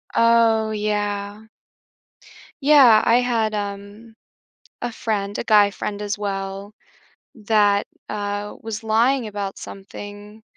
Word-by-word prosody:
Oh, 230 -1 +3
yeah. 205 0 -3 1.1
Yeah, 270 -7 +7
I 245 +2 +4
had, 230 -3 0
um, 205 +2 -6 0.7
a 240 - -3
friend 205 -3 -3
a - - -3
guy 210 -3 +5
friend 205 +1 -5
as 205 0 -3
well 195 0 -5 0.6
that, 205 -2 +2 0.2
uh, 205 0 -4
was 225 -1 -5
lying 235 +3 +2
about 200 -2 -5
something, 205 +2 -10
210 Hz, 110 wpm, -21 LUFS, 205-225 Hz, 1.1 s, Yeah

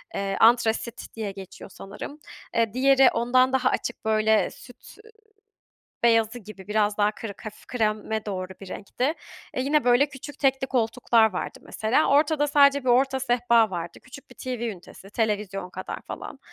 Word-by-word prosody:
Eee, 195 0 -2
antrasit 230 0 +2
diye 215 -3 -4
geçiyor 195 0 -11
sanırım. 210 +9 -9 0.4
Eee, 230 -2 +1
diğeri 270 +1 +5
ondan 255 +2 +2
daha 265 - +2
açık 240 - -4
böyle 220 0 +2
süt, - - -15
üüü, 450 - -17 0.9
beyazı 230 0 +3
gibi 205 -3 -12
biraz 210 -1 +1
daha 210 0 +3
kırık, 210 -2 -9
hafif 215 0 -10
kreme 220 -2 -1
doğru 185 -3 -4
bir 195 - -10
renkti. 250 - -2 0.4
E, - - -1
yine 290 +2 +1
böyle 245 +3 +4
küçük 285 +1 -10
tekli 265 -1 +1
koltuklar 230 -2 +2
vardı 180 - -5
mesela. 230 +8 0
Ortada 295 +1 +3
sadece 280 -1 +5
bir - - -1
orta 265 +2 +3
sehpa 240 -3 +3
vardı. 170 -2 -6
Küçük 260 +1 -14
bir - - -14
TV 255 -2 -5
ünitesi, 195 0 -13
televizyon 205 -4 -2
kadar 185 +1 -7
falan. - - -8
230 Hz, 160 wpm, -25 LUFS, 210-260 Hz, 0.9 s, diğeri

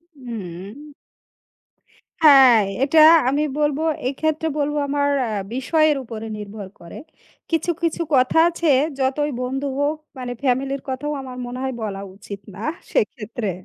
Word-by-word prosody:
উম 200 -8 -7 1.6
হ্যাঁ, 265 -7 +8 0.2
এটা 315 +3 +4 0.3
আমি 285 +3 +1 0.2
বলব, 295 -1 +1 0.3
এক্ষেত্রে 315 +3 -1
বলব, 295 0 0
আমার 285 0 +1 0.2
আ - - -4 0.2
বিষয়ের 310 +3 +2
উপরে 225 -1 -7
নির্ভর 205 -1 -8
করে। 170 - -10 0.5
কিছু, 330 +1 0
কিছু, 335 0 0
কথা 255 +4 +3
আছে, 335 -2 0 0.3
যতই 275 +3 0
বন্ধু 270 +3 -3
হোক, 290 +2 +1 0.2
মানে 250 -1 -4
ফ্যামিলির 270 +1 0
কথাও 270 +3 -3
আমার 255 -1 -8
মনে 245 +1 -6
হয় 265 -1 -2
বলা 200 -3 -4 0.2
উচিত 200 0 -9 0.2
না 210 - -7 0.3
সেক্ষেত্রে। 240 - -1
265 Hz, 130 wpm, -21 LUFS, 230-295 Hz, 1.6 s, হ্যাঁ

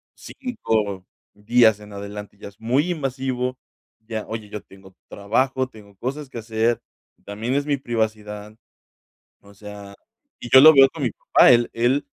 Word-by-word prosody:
5 110 - -3 0.3
días 110 0 +3
en 105 -1 -13
adelante 100 0 -8
ya - - -10
es 100 - -24
muy 135 +10 0
invasivo. 130 -4 -3 0.4
Ya: 110 -1 -6
"Oye, 110 -2 -6
yo 105 -1 -6
tengo 95 -1 -18
trabajo. 130 +6 -1
Tengo 105 -4 -16
cosas 135 +5 -5
que 120 - -7
hacer, 115 +1 -1 0.4
también 110 +5 -4
es 145 - 0
mi 145 - +1
privacidad". 110 -4 -4 0.9
O 100 0 -18
sea, 100 -1 -11 0.5
y 120 - -8
yo 130 - +10
lo 155 +3 +10
veo 135 -1 +8
con 160 - -8
mi 120 - 0
papá. - - +4
Él 120 -1 +3
él 130 +5 +1
110 Hz, 155 wpm, -22 LUFS, 105-130 Hz, 0.9 s, yo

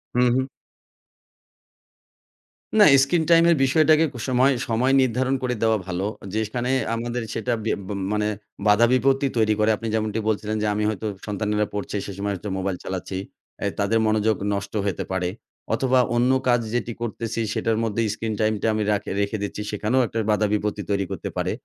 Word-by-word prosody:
হুম, 125 0 +4
হুম। 130 0 +1 2.3
না 205 - +9 0.2
screen 160 +3 +1
time 165 0 +7
এর 170 - +5
বিষয়টাকে 155 +3 +4
ক - - -16
সময়, 130 +2 +3
সময় 120 +4 +1
নির্ধারণ 130 +2 +1
করে 125 -1 0
দেওয়া 110 -1 +3
ভালো। 95 +2 -2 0.3
যে 110 - 0
সেখানে 125 +3 -3 0.3
আমাদের 120 +1 -3
সেটা 120 +2 -1
বে 110 - 0 0.2
ব - - -10 0.2
মানে 105 0 0 0.4
বাধা 105 +3 +6
বিপত্তি 135 +2 +2
তৈরি 110 -1 +3
করে। 105 +1 +3
আপনি 115 - -5
যেমনটি 110 0 -1
বলছিলেন 110 0 -1
যে - - +1
আমি 105 +1 -1
হয়তো 110 0 -4 0.2
সন্তানেরা 105 0 0
পড়ছে 105 0 -4
সে 100 - -6
সময় 100 0 -2
হচ্ছে 105 +3 -6
মোবাইল 95 -1 -2
চালাচ্ছি। 95 0 -4 0.5
আ - - 0
তাদের 105 +3 +2
মনোযোগ 110 0 +2 0.2
নষ্ট 100 +1 -4
হইতে 100 - -1
পারে 90 -1 -1 0.4
অথবা 130 +2 +2 0.2
অন্য 125 +2 +3 0.2
কাজ 120 -1 +4 0.2
যেটি 120 -1 -2
করতেছি 115 0 -3
সেটার 115 -1 0
মধ্যে 115 0 -1
স্ক্রিন 110 0 -3
টাইমটা 110 0 +1
আমি 110 0 0
রাখি 105 0 -1
রেখে 100 +2 -1
দিচ্ছি 100 +1 -4
সেখানেও 110 +5 +1
একটা 115 - -6
বাধা 105 0 +2
বিপত্তি 105 0 -1
তৈরি 100 -1 +1
করতে - - -4
পারে। - - 0
110 Hz, 175 wpm, -23 LUFS, 105-125 Hz, 2.3 s, না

